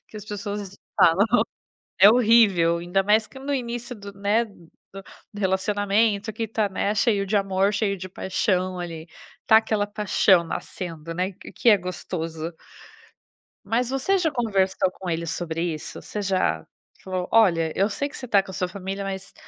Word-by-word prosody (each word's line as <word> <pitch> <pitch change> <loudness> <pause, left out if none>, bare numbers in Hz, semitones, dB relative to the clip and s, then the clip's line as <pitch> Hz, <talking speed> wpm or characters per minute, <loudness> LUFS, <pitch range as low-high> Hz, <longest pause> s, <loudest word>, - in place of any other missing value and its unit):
que - - -11
as 210 - -8
pessoas 205 -1 -6 0.2
falam. 180 +5 +5 0.7
É 200 +2 +9
horrível, 215 -8 +4
ainda 175 +3 0
mais 210 +2 +3
que 265 - -13
no 280 +2 -3
início 240 -1 -4
do 200 -2 -10
né, 205 +4 +1
do 185 -6 -18 0.6
do 205 - -8
relacionamento 205 +2 +1
que 225 +1 -3
tá, 215 -1 0
né, 200 +2 -1
cheio 205 -2 +2
de 210 +2 -1
amor, 195 +1 +1
cheio 200 -2 0
de 185 - -7
paixão, 185 -1 -1
ali. 165 -2 -6 0.4
Tá 220 - +7
aquela 220 -2 +1
paixão 205 -3 +3
nascendo, 165 -1 -6
né, 185 +3 -2
q - - -13
que 240 - +3
é 210 - +7
gostoso. 165 -2 -5 1.1
Mas 240 +2 0
você 270 +9 +1
já 335 -4 +1
conversou 195 -7 +1
com 185 -1 -7
ele 165 0 -2
sobre 165 0 -3
isso? 160 -3 -4
Você 210 - -5
já 185 - 0 0.4
falou: 185 -1 -3
"Olha, 170 -8 +4
eu 195 +2 +2
sei 285 +7 -3
que - - -10
você 255 - -7
tá 200 -4 +4
com 190 - -10
a - - -11
sua 185 -1 -1
família, 195 +1 -5
mas, 195 0 -6
195 Hz, 175 wpm, -24 LUFS, 180-215 Hz, 1.1 s, É